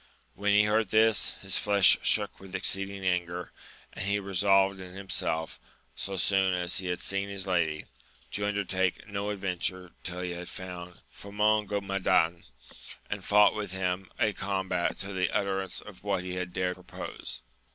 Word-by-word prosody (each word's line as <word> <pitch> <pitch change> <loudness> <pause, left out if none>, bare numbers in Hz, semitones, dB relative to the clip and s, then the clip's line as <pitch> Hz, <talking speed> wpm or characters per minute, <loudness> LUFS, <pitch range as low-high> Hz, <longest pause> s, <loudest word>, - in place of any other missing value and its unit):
When 105 +1 0
he 105 +1 +6
heard 105 0 +2
this, 110 +1 +4
his 95 -1 +2
flesh 100 -2 +6
shook - - +2
with 95 -1 -9
ex - - +2
ceeding 100 0 -5
anger, 90 -1 -1 0.4
and - - -3
he 100 +1 +2
resolved 95 0 +3
in 90 -1 -9
himself, 80 -4 -2 0.4
so 100 - -4
soon 95 0 +3
as 90 0 +1
he 95 - -4
had 90 -1 -2
seen 100 0 0
his 100 -1 -4
lady, 85 -5 0 0.5
to 105 +1 -1
undertake 95 -3 -1
no 100 0 -3
adventure 95 -2 -2
till 90 0 -4
he 90 -1 -3
had 90 0 -6
found 90 -1 -8 0.2
Famongomadan, 100 -4 +1 0.7
and 100 -2 -3
fought 105 +1 +6
with 105 -3 -4
him 95 0 -2
a 110 -2 +2
combat 95 -3 -1
to 100 0 -5
the 95 -2 +1
utterance 95 -2 -1
for 105 - -9
what 95 0 -2
he 90 0 -5
had 90 -1 -3
dared 90 0 -1
propose. 90 0 -7
95 Hz, 160 wpm, -29 LUFS, 90-100 Hz, 0.7 s, he